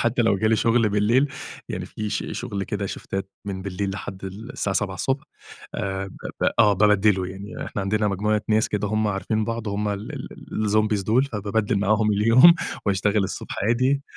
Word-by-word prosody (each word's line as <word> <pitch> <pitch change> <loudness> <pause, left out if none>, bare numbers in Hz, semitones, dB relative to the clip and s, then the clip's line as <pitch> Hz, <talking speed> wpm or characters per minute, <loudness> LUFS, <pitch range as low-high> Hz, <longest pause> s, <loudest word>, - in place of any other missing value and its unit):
حتى 120 +1 +2
لو 110 -3 +3
جِه 110 - 0
لي 110 +1 +4
شُغل 115 0 +3
بالليل، 110 +7 +3 0.4
يعني - - -4
في 105 -1 -5
ش - - -2
شُغل 105 -5 -4
كده 100 0 -3
شِفْتَات 95 0 -5
من 95 -2 -4
بالليل 100 +1 -3
لحد 95 0 -7
الساعة 100 0 -4
07:00 105 +7 -1 0.5
آآ، 95 -1 -2
ب - - -10 0.3
ب - - +1
آه، 105 -3 +6
بابدِّله 105 -1 +3
يعني. 100 +3 -7
إحنا 105 - -4
عندنا 105 +2 +1
مجموعة 105 +2 0
ناس 110 0 +3
كده 105 0 -1
هُم 110 +1 +1
عارفين 105 +2 -1
بعض 115 0 -3
هُم 105 +1 -1
ال 100 0 -4
ال - - -6 0.4
ال - - +1
الZombies 105 -1 +2
دول، 115 +7 +3
فبابدَّل 105 -4 -1
معاهم 105 +1 +2
اليوم 115 +11 +7 0.3
واشتغل 100 +1 +2
الصبح - - -5
عادي، 130 +5 +2
105 Hz, 180 wpm, -24 LUFS, 100-110 Hz, 0.5 s, اليوم